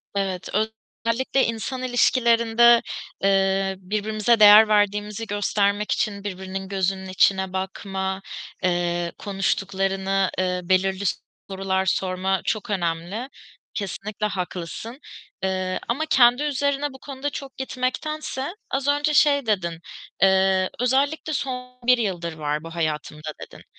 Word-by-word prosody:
Evet, 190 -2 -2 0.6
özellikle 260 +3 +1
insan 240 +3 -3
ilişkilerinde, 235 -1 +4 0.4
eee, 195 0 +2
birbirimize 215 +3 0
değer 210 +1 +9
verdiğimizi 210 +1 +1
göstermek 205 0 0
için 200 -1 -1
birbirinin 190 -1 -5
gözünün 190 -1 -2
içine 190 0 +2
bakma, 190 0 -3 0.4
eee, 175 -1 0
konuştuklarını 195 -1 0
ııı, 180 -1 -1
belirli 190 +1 +2 0.5
sorular 190 0 -1
sorma 185 0 0
çok 215 -2 -2
önemli. 180 +6 -2 0.4
Kesinlikle 205 +1 -4
haklısın. 185 - -5 0.4
Iıı, 185 -1 -1
ama 280 +7 -1
kendi 250 -1 +5
üzerine 285 0 0
bu 265 - -12
konuda 275 0 -5
çok 275 -1 -8
gitmektense, 265 +5 -3 0.2
az 270 +1 -1
önce 290 +1 +2
şey 285 -3 +4
dedin, 170 -6 -1 0.4
eee, 190 -1 +4
"Özellikle 280 +5 +1
son 250 -2 -4
1 250 - +6
yıldır 175 -7 -2
var 150 -1 -3
bu 165 +1 -9
hayatımda." 155 -1 -3
dedin. - - -11
200 Hz, 115 wpm, -23 LUFS, 190-245 Hz, 0.6 s, değer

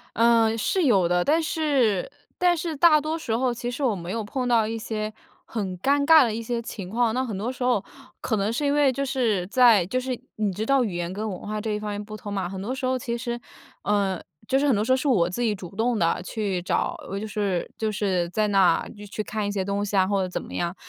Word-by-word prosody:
嗯， 230 -1 +4
是 370 - +1
有 200 - +4
的， 175 0 +2
但 315 +3 +3
是 280 - +1 0.3
但 355 -1 +3
是 330 -1 -3
大 305 +1 +6
多 310 +2 -2
时 240 -9 -2
候， 250 +1 +1
其 240 +1 -4
实 245 - -6
我 240 -6 +2
没 175 -1 -6
有 225 +1 -2
碰 250 +5 -3
到 230 -3 +3
一 225 +1 -3
些 215 -1 -4 0.3
很 195 -5 -4
尴 280 +7 +2
尬 320 0 +8
的 225 -3 -1
一 230 - -3
些 235 +1 -2
情 200 -5 -7
况。 230 +1 +1
那 255 - +1
很 220 -6 -4
多 215 +5 -2
时 255 0 -5
候， 245 -5 +2 0.4
可 225 - -1
能 205 +1 0
是 265 +6 -1
因 285 - +2
为， 290 -2 +4
就 275 +2 -2
是 225 -9 0
在 230 -4 +5
就 255 +8 -1
是 255 -1 -3 0.2
你 210 -2 0
知 210 +4 -3
道 275 +1 +3
语 200 -7 -3
言 175 +1 -3
跟 215 +3 -3
文 185 - -5
化 215 0 -3
这 220 0 -2
一 210 - -1
方 210 0 -4
面 205 0 -4
不 215 0 -8
通 205 0 -8
嘛， 190 -3 -2
很 190 0 -6
多 240 +7 -3
时 260 - -3
候 255 0 0
其 235 -1 -3
实 240 0 -4 0.4
呃， 200 -3 0 0.3
就 265 - +3
是 290 - +2
很 265 - +4
多 205 - +1
时 245 - 0
候 260 - +5
是 265 - -2
我 185 -10 +3
自 180 +7 -4
己 220 -3 +1
主 185 -2 -10
动 235 +1 +1
地 170 -3 +1
去 195 -3 -2
找， 180 - -1 0.2
就 210 - -4
是 200 -4 -2
就 220 - -1
是 190 -4 0
在 210 +2 +1
那 195 -4 +4 0.2
去 215 +2 -3
看 215 -1 -3
一 - - -1
些 200 -2 -1
东 200 +1 -1
西 205 - -3
啊， 190 -1 +5
或 195 0 +1
者 185 - -1
怎 180 - -4
么 - - -11
样。 175 +1 -2
220 Hz, 285 characters per minute, -25 LUFS, 200-255 Hz, 0.4 s, 尬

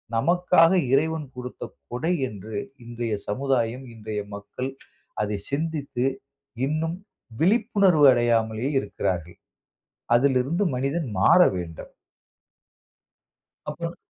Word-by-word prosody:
நமக்காக 175 +5 +4 0.2
இறைவன் 155 +3 +1
கொடுத்த 125 0 -7 0.3
கொடை 160 +9 0 0.2
என்று 105 +1 -9 0.3
இன்றைய 120 -1 -4
சமுதாயம், 125 +1 -1
இன்றைய 110 -1 -5
மக்கள் 105 +6 -5 0.5
அதை 105 -1 -2
சிந்தித்து 140 -4 -2 0.6
இன்னும் 160 +4 -1 0.4
விழிப்புணர்வு 195 - +4
அடையாமலே 115 0 +1
இருக்கிறார்கள். 90 -5 -3 0.8
அதிலிருந்து 135 +7 +2
மனிதன் 140 +4 -1
மாற 175 - +6 0.2
வேண்டும். 85 -2 -7 1.8
அப்புறம் - - -5
130 Hz, 85 wpm, -25 LUFS, 110-160 Hz, 1.8 s, மாற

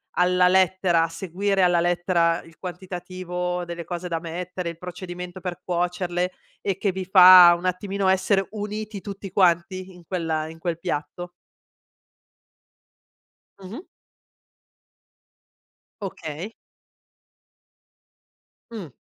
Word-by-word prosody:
alla 180 0 +4
lettera, 185 -2 +3
a 165 - 0
seguire 190 +3 -1
alla 175 -1 +4
lettera 175 -1 +1
il 165 0 -18
quantitativo 180 -1 -5
delle 170 -1 -6
cose 175 0 -5
da 165 -1 -2
mettere, 175 +1 -5
il 170 0 -9
procedimento 180 0 -7
per 180 -1 -6
cuocerle 180 0 -1 0.3
e 195 -2 -2
che 200 - +1
vi 185 0 -5
fa 180 -2 +9
un 175 - -7
attimino 195 +1 -1
essere 195 +1 +2
uniti 210 -1 -5
tutti 195 -1 -8
quanti 185 +1 +1
in 175 - -15
quel 160 -4 -2
in 165 - -11
quel 170 -1 -3
piatto? 175 +1 -4 2.3
Mh-mh. 200 - -8 2.2
Okay. 180 0 -6 2.2
Mh. 195 -10 -7
180 Hz, 105 wpm, -24 LUFS, 175-190 Hz, 2.3 s, fa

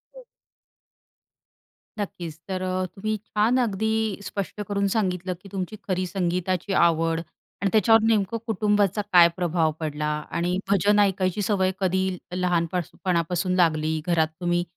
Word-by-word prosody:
हं. - - -11 1.8
नक्कीच 170 -6 -5
तर 190 -1 -3
अ, 185 0 -1
तुम्ही 215 +4 -3
छान 225 +4 +2
अगदी 220 -1 0 0.3
स्पष्ट 200 +1 -4
करून 200 -1 0
सांगितलं 185 -3 -1
की 195 - -13
तुमची 195 +1 -4
खरी 185 -1 0
संगीताची 180 +1 -1
आवड 165 -1 +1 0.4
आणि 200 - +2
त्याच्यावर 225 +1 +5
नेमकं 220 -1 +1
कुटुंबाचा 210 -2 +1
काय 175 -1 +9
प्रभाव 170 -3 +1
पडला 150 -1 -3 0.3
आणि 175 +2 0
भजन 200 +2 +3
ऐकायची 190 -1 +1
सवय 190 -2 +1
कधी 190 -1 +1 0.3
लहानपणापासून 180 0 -1
लागली. 160 -3 +2
घरात 165 -2 +3
तुम्ही 175 0 +1
185 Hz, 125 wpm, -25 LUFS, 175-200 Hz, 1.8 s, काय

